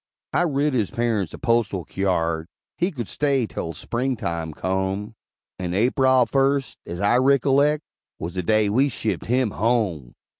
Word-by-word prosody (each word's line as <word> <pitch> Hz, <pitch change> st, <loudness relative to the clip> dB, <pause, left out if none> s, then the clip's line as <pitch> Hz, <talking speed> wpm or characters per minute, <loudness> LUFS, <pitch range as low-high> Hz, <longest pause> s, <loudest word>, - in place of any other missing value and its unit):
I 175 Hz, -, +3 dB
writ 145 Hz, -2 st, +1 dB
his 110 Hz, -7 st, +1 dB
parents 110 Hz, -7 st, -1 dB
a -, -, -8 dB
postal 115 Hz, -, 0 dB
kyard, 85 Hz, -4 st, -1 dB, 0.3 s
He 175 Hz, -, +1 dB
could 125 Hz, -, -5 dB
stay 140 Hz, -4 st, +1 dB
'tel 85 Hz, -5 st, -5 dB
Spring 125 Hz, +7 st, -2 dB
time 85 Hz, -6 st, -3 dB
come; 95 Hz, +5 st, -2 dB, 0.5 s
And 90 Hz, -1 st, -3 dB
Aprile 130 Hz, +3 st, +4 dB
first, 135 Hz, +1 st, +1 dB
as 85 Hz, -, -5 dB
I 100 Hz, +5 st, +3 dB
rickollect, 140 Hz, +2 st, +3 dB, 0.4 s
Was 85 Hz, +2 st, -5 dB
the 95 Hz, -, -2 dB
day 110 Hz, +3 st, +2 dB
we 130 Hz, +8 st, +3 dB
shipped 110 Hz, -3 st, -3 dB
him 125 Hz, -2 st, +2 dB
home! 100 Hz, -, 0 dB
115 Hz, 155 wpm, -23 LUFS, 95-135 Hz, 0.5 s, Aprile